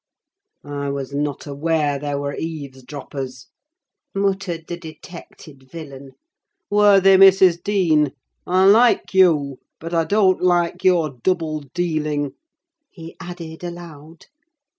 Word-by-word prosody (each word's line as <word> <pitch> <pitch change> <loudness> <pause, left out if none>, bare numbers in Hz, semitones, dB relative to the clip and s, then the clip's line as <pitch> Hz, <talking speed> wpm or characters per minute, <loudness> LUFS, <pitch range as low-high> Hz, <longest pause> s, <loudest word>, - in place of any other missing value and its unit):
"I 145 -1 -4
was 140 0 -5
not 145 0 -3
aware 145 0 -1
there 145 0 -3
were 140 0 -4
eavesdroppers," 135 -3 -7 0.7
muttered 195 -4 -2
the 175 - -5
detected 155 -4 -13
villain. 140 -5 -10 0.6
"Worthy 200 -2 +5
Mrs. 190 -2 +6
Dean, 165 -8 +1 0.4
I 185 +1 +3
like 225 +4 +4
you, 150 -8 +3 0.2
but 165 +1 -7
I 165 -1 +1
don't 190 +1 +2
like 175 0 +1
your 175 -5 +3
double 165 -3 -1 0.2
dealing," 155 -5 -1 0.6
he 165 -2 -12
added 170 -2 -9
aloud. 165 -2 -10
165 Hz, 110 wpm, -20 LUFS, 145-180 Hz, 0.7 s, Mrs